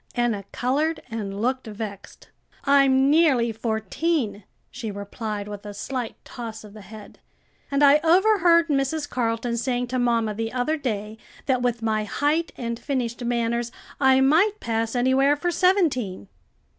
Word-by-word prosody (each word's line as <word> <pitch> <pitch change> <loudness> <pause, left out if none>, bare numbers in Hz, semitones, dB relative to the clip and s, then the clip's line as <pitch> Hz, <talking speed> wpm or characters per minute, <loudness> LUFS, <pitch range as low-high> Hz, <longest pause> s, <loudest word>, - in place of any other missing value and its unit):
Enna 235 -5 0
colored 300 +6 -1
and 200 -3 -4
looked 255 +2 -1
vexed. 210 -2 -8 0.3
"I'm 275 -1 +4
nearly 280 -8 +4
fourteen," 220 - -2 0.3
she 235 -3 -6
replied 205 +1 -5
with 205 -1 -8
a 205 -1 -8
slight 250 +2 -4
toss 230 -3 -8
of 210 -1 -13
the 215 - -11
head; 215 +1 -12 0.5
"and 280 +1 +1
I 285 +1 +7
overheard 345 -1 +4
Mrs. 290 +2 0
Carleton 235 -2 -1
saying 245 0 -1
to 255 0 -1
mamma 230 -3 +1
the 225 +2 -4
other 255 +5 0
day, 220 -6 -4 0.3
that 260 -2 +1
with 240 -2 -1
my 215 -1 0
height 300 +9 0
and 235 -1 -4
finished 250 -4 -3
manners 235 0 -1 0.3
I 265 -1 +5
might 360 +10 +3
pass 225 0 -2
anywhere 260 +3 +3
for 350 +4 -1
seventeen." 310 - +1
245 Hz, 145 wpm, -24 LUFS, 220-280 Hz, 0.5 s, I